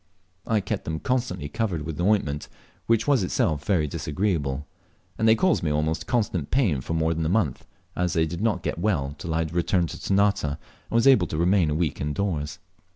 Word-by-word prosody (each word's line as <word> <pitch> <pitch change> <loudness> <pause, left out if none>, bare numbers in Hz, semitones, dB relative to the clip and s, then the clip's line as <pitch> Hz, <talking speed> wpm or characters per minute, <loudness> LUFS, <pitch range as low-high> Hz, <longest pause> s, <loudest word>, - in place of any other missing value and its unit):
I 110 -2 +2
kept 105 +1 -3
them 80 0 -3
constantly 120 - -1
covered 95 -5 -2
with 80 +2 -4
ointment, 90 -7 +1 0.4
which 115 0 +2
was 140 -5 +4
itself 80 -4 0
very 85 -4 +2
disagreeable, 75 -2 -2 0.5
and 110 - +1
they 110 - +7
caused 185 +6 +2
me 80 - 0
almost 75 +2 -1
constant 100 - 0
pain 100 - +2
for 80 - -3
more 80 0 +1
than 80 0 -2
a 80 - 0
month, 90 - 0 0.3
as 90 -1 0
they 80 -1 +2
did 85 +3 -5
not 105 -6 0
get - - -2
well 80 -8 0
till 80 +1 -3
I 80 0 +1
had 80 - -8
returned 85 0 +1
to - - -8
Ternate, 100 0 +2
and 75 -1 -2 0.3
was 115 0 +2
able 130 -11 +6
to 75 - -4
remain 90 0 +3
a 75 - 0
week 80 -4 -1
indoors. 75 0 -2
85 Hz, 205 wpm, -25 LUFS, 75-105 Hz, 0.5 s, they